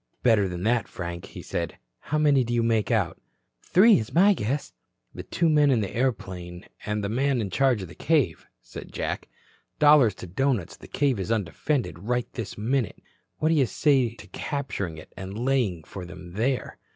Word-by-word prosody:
"Better 110 Hz, -5 st, +4 dB
than 90 Hz, 0 st, -5 dB
that, 115 Hz, 0 st, +1 dB
Frank," 85 Hz, -1 st, -6 dB
he -, -, -10 dB
said. -, -, -3 dB, 0.2 s
"How 155 Hz, -, -2 dB
many 145 Hz, -3 st, +4 dB
do 120 Hz, 0 st, -2 dB
you 120 Hz, -, +2 dB
make 115 Hz, -2 st, +1 dB
out?" 100 Hz, -8 st, 0 dB, 0.4 s
"Three 210 Hz, +4 st, +5 dB
is 110 Hz, +5 st, -6 dB
my 200 Hz, +4 st, +6 dB
guess." 140 Hz, -, -3 dB, 0.4 s
"The -, -, -6 dB
two 170 Hz, -, 0 dB
men 150 Hz, -2 st, +4 dB
in 125 Hz, -5 st, +3 dB
the 100 Hz, -, -4 dB
airplane 95 Hz, -8 st, -3 dB, 0.2 s
and 105 Hz, 0 st, -1 dB
the -, -, 0 dB
man 130 Hz, +4 st, +1 dB
in 100 Hz, -4 st, -3 dB
charge 130 Hz, -3 st, +2 dB
of -, -, -6 dB
the 85 Hz, -, -12 dB
cave," 140 Hz, -, 0 dB, 0.2 s
said -, -, -10 dB
Jack. -, -, -4 dB, 0.5 s
"Dollars 145 Hz, -9 st, +6 dB
to -, -, -9 dB
doughnuts, 110 Hz, +1 st, -1 dB
the -, -, -14 dB
cave 140 Hz, -6 st, +1 dB
is 95 Hz, +4 st, -3 dB
undefended 115 Hz, -, -1 dB
right 120 Hz, +5 st, -1 dB
this 115 Hz, -4 st, -6 dB
minute. 120 Hz, +2 st, -1 dB, 0.4 s
What 155 Hz, -, +1 dB
do -, -, +4 dB
you 140 Hz, -5 st, +3 dB
say 130 Hz, -3 st, +2 dB
to -, -, -12 dB
capturing 100 Hz, -, -4 dB
it 80 Hz, -, -13 dB
and 95 Hz, +2 st, -7 dB
laying 120 Hz, -9 st, 0 dB
for 95 Hz, -, -8 dB
them 90 Hz, 0 st, -10 dB
there?" 120 Hz, +6 st, -1 dB
115 Hz, 190 wpm, -26 LUFS, 95-135 Hz, 0.5 s, my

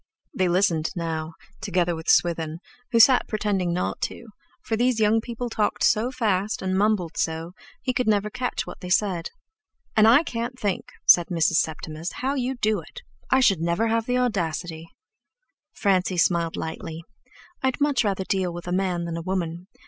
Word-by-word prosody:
They 185 Hz, -, +1 dB
listened 170 Hz, -3 st, +2 dB
now, 160 Hz, -1 st, -4 dB, 0.3 s
together 180 Hz, -5 st, 0 dB
with 160 Hz, 0 st, -6 dB
Swithin, 165 Hz, -2 st, +2 dB, 0.3 s
who 230 Hz, -, +3 dB
sat 250 Hz, +3 st, +6 dB
pretending 200 Hz, -5 st, -1 dB
not 180 Hz, +1 st, -2 dB
to, 235 Hz, -, -9 dB, 0.3 s
for 225 Hz, -, -1 dB
these 245 Hz, 0 st, +1 dB
young 220 Hz, +1 st, +3 dB
people 240 Hz, +1 st, -5 dB
talked 210 Hz, -2 st, -1 dB
so 220 Hz, +3 st, +3 dB
fast 215 Hz, -6 st, -1 dB
and 185 Hz, 0 st, 0 dB
mumbled 195 Hz, -4 st, +1 dB
so, 160 Hz, +1 st, -2 dB, 0.3 s
he 255 Hz, -, 0 dB
never 210 Hz, 0 st, +2 dB
could -, -, -10 dB
catch 250 Hz, -, -1 dB
what -, -, -9 dB
they 180 Hz, -, -6 dB
said. 180 Hz, -3 st, +1 dB, 0.7 s
"And 215 Hz, 0 st, +6 dB
I 250 Hz, +8 st, +6 dB
can't 240 Hz, -2 st, -4 dB
think," 200 Hz, -3 st, -1 dB, 0.2 s
said 175 Hz, -1 st, +7 dB
Mrs. 165 Hz, -2 st, +2 dB
Septimus, 160 Hz, +1 st, -4 dB
"how 265 Hz, +2 st, -2 dB
you 265 Hz, -1 st, -1 dB
do 215 Hz, -4 st, +1 dB
it. 165 Hz, -, -12 dB, 0.3 s
I 265 Hz, -, +4 dB
should 195 Hz, -9 st, +3 dB
never 170 Hz, +7 st, +1 dB
have 230 Hz, 0 st, 0 dB
the 250 Hz, 0 st, +1 dB
audacity!" 170 Hz, -8 st, -2 dB, 0.8 s
Francie 185 Hz, -2 st, +1 dB
smiled 170 Hz, -1 st, +2 dB
lightly. 160 Hz, 0 st, -6 dB, 0.6 s
"I'd 260 Hz, +1 st, 0 dB
much 285 Hz, -4 st, +2 dB
rather 195 Hz, -2 st, -1 dB
deal 185 Hz, -2 st, -1 dB
with 175 Hz, +1 st, -8 dB
a -, -, -3 dB
man 180 Hz, -2 st, 0 dB
than 170 Hz, -1 st, -4 dB
a -, -, -4 dB
woman. 175 Hz, -1 st, -3 dB
190 Hz, 175 wpm, -24 LUFS, 170-225 Hz, 0.8 s, said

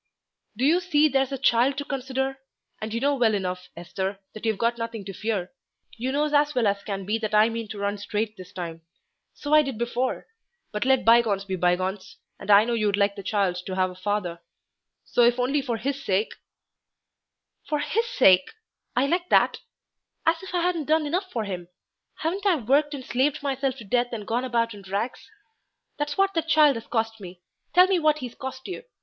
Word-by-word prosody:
"Do 255 Hz, -, +1 dB
you 330 Hz, +5 st, +4 dB
see, 310 Hz, -4 st, +3 dB
there's 270 Hz, -1 st, +1 dB
the 275 Hz, -, -3 dB
child 250 Hz, +3 st, +3 dB
to 285 Hz, -, -3 dB
consider? 265 Hz, -1 st, -3 dB, 0.4 s
And 215 Hz, 0 st, -4 dB
you 230 Hz, -, -1 dB
know 285 Hz, +3 st, +2 dB
well 235 Hz, -5 st, +2 dB
enough, 180 Hz, -2 st, -4 dB
Esther, 190 Hz, +3 st, -4 dB, 0.2 s
that 215 Hz, +1 st, -5 dB
you've 220 Hz, -3 st, 0 dB, 0.2 s
nothing 230 Hz, -3 st, -5 dB
to 195 Hz, -, -6 dB
fear; 205 Hz, -3 st, -3 dB, 0.4 s
you 250 Hz, +3 st, -2 dB
knows 300 Hz, +2 st, 0 dB
as 295 Hz, 0 st, +3 dB
well 245 Hz, -3 st, +2 dB
as 200 Hz, 0 st, +1 dB
can 195 Hz, -2 st, -4 dB
be 215 Hz, +3 st, 0 dB
that 215 Hz, -1 st, -2 dB
I 215 Hz, +2 st, +6 dB
mean 230 Hz, -1 st, -4 dB
to 210 Hz, -, -7 dB
run 200 Hz, 0 st, -2 dB
straight 210 Hz, +1 st, -2 dB
this 185 Hz, -3 st, -12 dB
time. 165 Hz, -3 st, -6 dB, 0.5 s
So 290 Hz, +1 st, -3 dB
I 305 Hz, -, +8 dB
did 270 Hz, -6 st, -4 dB
before. 240 Hz, +2 st, -2 dB, 0.5 s
But 210 Hz, +2 st, -2 dB
let 265 Hz, -1 st, +3 dB
bygones 225 Hz, -4 st, +4 dB
be 190 Hz, -1 st, -3 dB
bygones, 185 Hz, +2 st, -1 dB, 0.2 s
and -, -, -10 dB
I 205 Hz, +1 st, +7 dB
know 240 Hz, -, -1 dB
you'd 210 Hz, -3 st, +1 dB
like 200 Hz, 0 st, +2 dB
the 200 Hz, -, -7 dB
child 195 Hz, -2 st, 0 dB
to 185 Hz, -, -3 dB
have 185 Hz, -1 st, +1 dB
a -, -, -12 dB
father; 185 Hz, -3 st, -2 dB, 0.6 s
so -, -, +1 dB
if 240 Hz, +1 st, +5 dB
only 275 Hz, +4 st, +1 dB
for 245 Hz, -4 st, -2 dB
his 275 Hz, +4 st, -3 dB
sake 200 Hz, +3 st, 0 dB, 0.7 s
" -, -, -58 dB
"For 300 Hz, -, +1 dB
his 345 Hz, +11 st, 0 dB
sake! 185 Hz, -, +5 dB, 0.5 s
I 250 Hz, +3 st, +3 dB
like 350 Hz, +5 st, 0 dB
that; -, -, +4 dB, 0.7 s
as 325 Hz, +1 st, +2 dB
if 380 Hz, -, -9 dB
I 345 Hz, -, +1 dB
hadn't 345 Hz, -4 st, 0 dB
done 310 Hz, +1 st, +2 dB
enough 365 Hz, +6 st, -2 dB
for 225 Hz, -, -2 dB
him. 180 Hz, -4 st, -5 dB, 0.5 s
Haven't 380 Hz, +6 st, -1 dB
I 375 Hz, -, +5 dB
worked 290 Hz, +3 st, +1 dB
and 260 Hz, -3 st, -8 dB
slaved 280 Hz, +4 st, 0 dB
myself 270 Hz, -2 st, -1 dB
to 235 Hz, -, -9 dB
death 245 Hz, +3 st, 0 dB
and 215 Hz, -3 st, -5 dB
gone 240 Hz, +4 st, -1 dB
about 230 Hz, -2 st, 0 dB
in 205 Hz, -, -11 dB
rags? 200 Hz, +6 st, -4 dB, 0.7 s
That's 295 Hz, 0 st, -2 dB
what 390 Hz, 0 st, +3 dB
that 330 Hz, -2 st, -1 dB
child 305 Hz, -3 st, +5 dB
has 230 Hz, 0 st, -7 dB
cost 225 Hz, -1 st, -1 dB
me. 180 Hz, -1 st, -10 dB, 0.3 s
Tell 360 Hz, +1 st, +8 dB
me 375 Hz, -1 st, +2 dB
what 305 Hz, -2 st, +3 dB
he's 250 Hz, -5 st, -6 dB
cost 265 Hz, 0 st, -7 dB
you. 370 Hz, -, -5 dB
235 Hz, 210 wpm, -25 LUFS, 205-285 Hz, 0.7 s, I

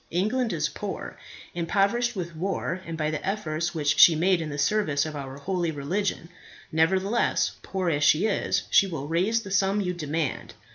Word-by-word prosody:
England 215 Hz, +8 st, 0 dB
is 150 Hz, -4 st, 0 dB
poor, 200 Hz, +7 st, -6 dB, 0.4 s
impoverished 200 Hz, +8 st, +1 dB
with 170 Hz, -3 st, -5 dB
war 185 Hz, +1 st, -2 dB
and 165 Hz, -1 st, -5 dB
by 155 Hz, -1 st, -1 dB
the 155 Hz, -, -4 dB
efforts 170 Hz, -4 st, -2 dB
which 150 Hz, -2 st, +1 dB
she 165 Hz, -, +9 dB
made 175 Hz, +2 st, +2 dB
in 155 Hz, -, -4 dB
the 145 Hz, -, -5 dB
service 150 Hz, -4 st, +1 dB
of 155 Hz, -1 st, -6 dB
our 135 Hz, -1 st, -6 dB
holy 175 Hz, +3 st, -2 dB
religion. 165 Hz, +5 st, -2 dB, 0.4 s
Nevertheless, 190 Hz, +8 st, +1 dB
poor 190 Hz, -2 st, -3 dB
as 150 Hz, -1 st, 0 dB
she 155 Hz, +6 st, +4 dB
is, 215 Hz, -, 0 dB
she 200 Hz, -, +5 dB
will 155 Hz, -6 st, -5 dB
raise 195 Hz, +8 st, +1 dB
the 195 Hz, -, -8 dB
sum 195 Hz, +1 st, +2 dB
you 180 Hz, -3 st, -1 dB
demand. 155 Hz, -3 st, -3 dB
175 Hz, 180 wpm, -26 LUFS, 155-195 Hz, 0.4 s, she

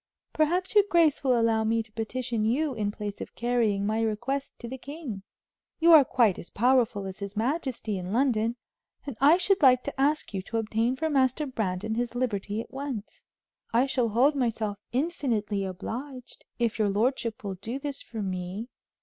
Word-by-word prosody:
Perhaps 355 Hz, +5 st, +1 dB
your 415 Hz, -1 st, +7 dB
grace 330 Hz, -5 st, +3 dB
will 255 Hz, -3 st, +3 dB
allow 225 Hz, -1 st, +2 dB
me 225 Hz, +1 st, +1 dB
to 220 Hz, -, -19 dB
petition 230 Hz, +1 st, -2 dB
you 270 Hz, +6 st, +1 dB
in 210 Hz, -3 st, -1 dB
place 205 Hz, 0 st, -6 dB
of -, -, -8 dB
carrying 230 Hz, -4 st, +1 dB
my 220 Hz, +2 st, 0 dB
request 240 Hz, +6 st, -2 dB
to 240 Hz, -, -8 dB
the 260 Hz, +2 st, -7 dB
king. 280 Hz, -8 st, -7 dB, 0.6 s
You 335 Hz, +1 st, +6 dB
are 305 Hz, -3 st, +10 dB
quite 235 Hz, -7 st, +2 dB
as -, -, -9 dB
powerful 240 Hz, -3 st, +2 dB
as 190 Hz, -1 st, -7 dB
his 200 Hz, +1 st, -6 dB
majesty 240 Hz, -, -1 dB
in 180 Hz, +1 st, -5 dB
London, 230 Hz, -2 st, +1 dB, 0.5 s
and 280 Hz, -5 st, -5 dB
I 300 Hz, +5 st, +7 dB
should 380 Hz, +1 st, +1 dB
like 255 Hz, -3 st, +6 dB
to 280 Hz, -1 st, -4 dB
ask 295 Hz, -4 st, +1 dB
you 190 Hz, -, -2 dB
to 230 Hz, +5 st, -4 dB
obtain 225 Hz, +3 st, 0 dB
for 320 Hz, +4 st, -1 dB
Master 270 Hz, 0 st, +2 dB
Brandon 220 Hz, -5 st, -2 dB
his 240 Hz, +1 st, -2 dB
liberty 210 Hz, -4 st, -2 dB
at -, -, -12 dB
once. 265 Hz, -6 st, -6 dB, 0.5 s
I 240 Hz, +3 st, +4 dB
shall 255 Hz, -4 st, 0 dB
hold 250 Hz, +7 st, +4 dB
myself 225 Hz, -5 st, -1 dB
infinitely 240 Hz, -, -1 dB
obliged, 245 Hz, +8 st, -7 dB
if 235 Hz, -2 st, 0 dB
your 210 Hz, -2 st, +3 dB
lordship 230 Hz, +2 st, 0 dB
will 200 Hz, -2 st, -3 dB
do 225 Hz, +7 st, -5 dB
this 280 Hz, 0 st, -4 dB
for 220 Hz, -3 st, -6 dB
me." 185 Hz, +4 st, -4 dB
235 Hz, 185 wpm, -27 LUFS, 215-270 Hz, 0.6 s, are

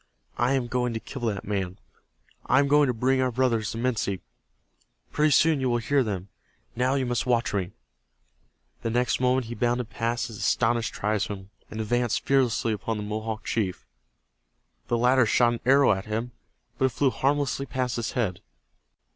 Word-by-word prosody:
I 125 Hz, +2 st, +2 dB
am 130 Hz, -2 st, +1 dB
going 125 Hz, -1 st, -1 dB
to -, -, -2 dB
kill 135 Hz, +3 st, -8 dB
that 100 Hz, -3 st, -3 dB
man. 95 Hz, -2 st, -2 dB, 0.7 s
I -, -, +4 dB
am 140 Hz, +1 st, +4 dB
going 145 Hz, 0 st, +5 dB
to -, -, +2 dB
bring 130 Hz, +3 st, +1 dB
our 130 Hz, -, +2 dB
brothers, 115 Hz, -3 st, +1 dB
the -, -, -6 dB
Minsi. 115 Hz, -6 st, -1 dB, 0.9 s
Pretty 150 Hz, +1 st, +3 dB
soon 150 Hz, 0 st, +4 dB
you 130 Hz, -, +1 dB
will 120 Hz, -, +2 dB
hear 135 Hz, +4 st, +1 dB
them. 100 Hz, -4 st, -4 dB, 0.5 s
Now 125 Hz, +3 st, +1 dB
you 135 Hz, -2 st, 0 dB
must 120 Hz, +1 st, -1 dB
watch 120 Hz, -2 st, +1 dB
me." 95 Hz, -2 st, -2 dB, 1.1 s
The 115 Hz, -, -2 dB
next 120 Hz, +2 st, +1 dB
moment 125 Hz, 0 st, +2 dB
he 115 Hz, -, -6 dB
bounded 120 Hz, -1 st, -1 dB
past 115 Hz, +1 st, -1 dB
his 110 Hz, -, -8 dB
astonished 115 Hz, +1 st, +1 dB
tribesmen, 105 Hz, -2 st, -2 dB, 0.2 s
and 110 Hz, -, -7 dB
advanced 120 Hz, +2 st, 0 dB
fearlessly 125 Hz, -4 st, +2 dB
upon 110 Hz, +2 st, -3 dB
the 105 Hz, -, -4 dB
Mohawk 110 Hz, +1 st, -4 dB
chief. 95 Hz, -5 st, -2 dB, 1.0 s
The 120 Hz, -, +1 dB
latter 125 Hz, 0 st, +4 dB
shot 120 Hz, +2 st, +3 dB
an 120 Hz, -, -4 dB
arrow 140 Hz, +1 st, +6 dB
at 95 Hz, -1 st, -1 dB
him, 110 Hz, +3 st, -3 dB, 0.5 s
but 130 Hz, -, +3 dB
it -, -, +3 dB
flew 135 Hz, +2 st, +2 dB
harmlessly 140 Hz, 0 st, 0 dB
past 125 Hz, -1 st, -2 dB
his 115 Hz, -1 st, -3 dB
head. 105 Hz, -8 st, -1 dB
120 Hz, 180 wpm, -26 LUFS, 110-130 Hz, 1.1 s, arrow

